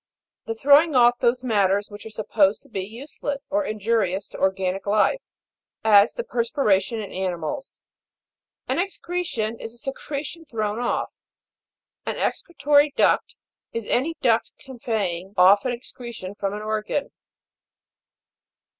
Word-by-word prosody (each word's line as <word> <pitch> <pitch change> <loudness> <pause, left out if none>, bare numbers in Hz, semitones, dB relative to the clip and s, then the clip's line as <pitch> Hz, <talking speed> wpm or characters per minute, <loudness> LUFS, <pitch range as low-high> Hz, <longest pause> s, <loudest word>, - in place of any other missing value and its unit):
The 225 - -3
throwing 290 +5 +5
off 245 -1 +5
those 250 +2 +2
matters 205 -3 +1
which 205 +2 -9
are - - -8
supposed 210 -2 +1
to 280 - -21
be 195 - -3
useless, 275 +6 -6
or 305 +1 +2
injurious 215 -4 0
to - - -10
organic 190 0 0
life, 215 - +3 0.6
as 210 0 +6
the 480 - -3
perspiration 230 - +1
in 210 - -6
animals. 190 +10 -4 0.9
An - - 0
excretion 345 - -2
is 225 +1 -8
a - - -13
secretion 285 +5 -6
thrown 215 -4 -2
off. 245 - -1 0.9
An - - -3
excretory 295 -4 +2
duct, - - +2 0.4
is 230 -2 -3
any 295 +10 0
duct 230 -3 +2
conveying 210 -8 -4
off 195 +4 +6
an 255 - +1
excretion 235 -5 -7
from 200 0 -3
an 210 - -6
organ. 215 +6 -2
225 Hz, 130 wpm, -24 LUFS, 205-275 Hz, 0.9 s, as